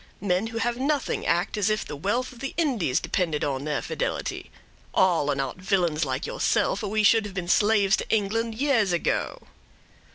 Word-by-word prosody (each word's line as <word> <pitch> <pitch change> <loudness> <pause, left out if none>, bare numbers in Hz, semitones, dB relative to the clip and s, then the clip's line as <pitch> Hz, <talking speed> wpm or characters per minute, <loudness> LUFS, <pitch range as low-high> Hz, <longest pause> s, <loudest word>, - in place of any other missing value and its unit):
Men 190 +2 0
who 225 0 -6
have 235 +1 -1
nothing, 285 +1 -1
act 175 +5 +1
as 210 0 +2
if 215 0 0
the 150 - -6
wealth 205 - -1
of 240 - -15
the 275 - -5
Indies 225 - +1
depended 165 -7 -1
on 140 -1 -2
their 150 -1 -1
fidelity; - - -3 0.5
all 170 -6 +3
are 145 - +1
not 135 +1 -3
villains 180 -5 0
like 130 0 -3
yourself, 200 - 0
or 210 - -3
we 215 +1 +1
should 220 +2 +5
have 200 -2 -8
been 180 -2 -3
slaves 205 0 +4
to - - -5
England 220 +2 0
years 235 -6 +2
ago." 170 - -1
200 Hz, 190 wpm, -25 LUFS, 170-225 Hz, 0.5 s, should